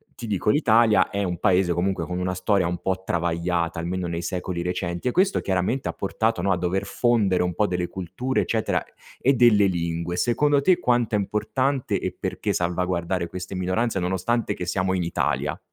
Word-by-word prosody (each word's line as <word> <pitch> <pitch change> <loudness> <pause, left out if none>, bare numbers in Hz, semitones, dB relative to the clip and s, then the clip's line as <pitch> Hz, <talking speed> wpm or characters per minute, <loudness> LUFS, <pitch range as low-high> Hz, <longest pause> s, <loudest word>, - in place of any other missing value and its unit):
ti 120 - -7
dico 105 -1 -1
l’Italia 115 -7 +4
è 100 - -1
un 90 -3 -2
paese 90 -1 +2
comunque 95 +3 -1
con 90 0 -3
una 90 0 -1
storia 90 0 +1
un 90 0 -2
po’ 95 0 -2
travagliata, 85 0 -1
almeno 90 +2 -2
nei 85 0 -3
secoli 90 0 -3
recenti, 90 +2 -3
e - - +2
questo 190 +7 +2
chiaramente 95 +8 -1
ha - - -3
portato, 110 0 -1
no, 95 +1 +1
a 90 - +2
dover 90 +2 -1
fondere 105 -7 +2
un 90 -1 -1
po’ 105 +4 +1
delle 90 -1 -1
culture 95 +10 -2
eccetera 110 -1 0 0.4
e 135 - +4
delle 115 -5 +5
lingue. 85 -1 -2
Secondo 145 +4 +2
te, 180 +4 +3
quanto 120 -5 +1
è 105 - +3
importante, 130 +7 -1
e - - -4
perché, - - -2
salvaguardare 90 0 -1
queste 90 +2 -7
minoranze, 95 +4 0
nonostante 95 +6 -1
che 90 - -5
siamo 95 +1 0
in 90 - 0
Italia? 85 - -1
95 Hz, 185 wpm, -24 LUFS, 90-110 Hz, 0.4 s, delle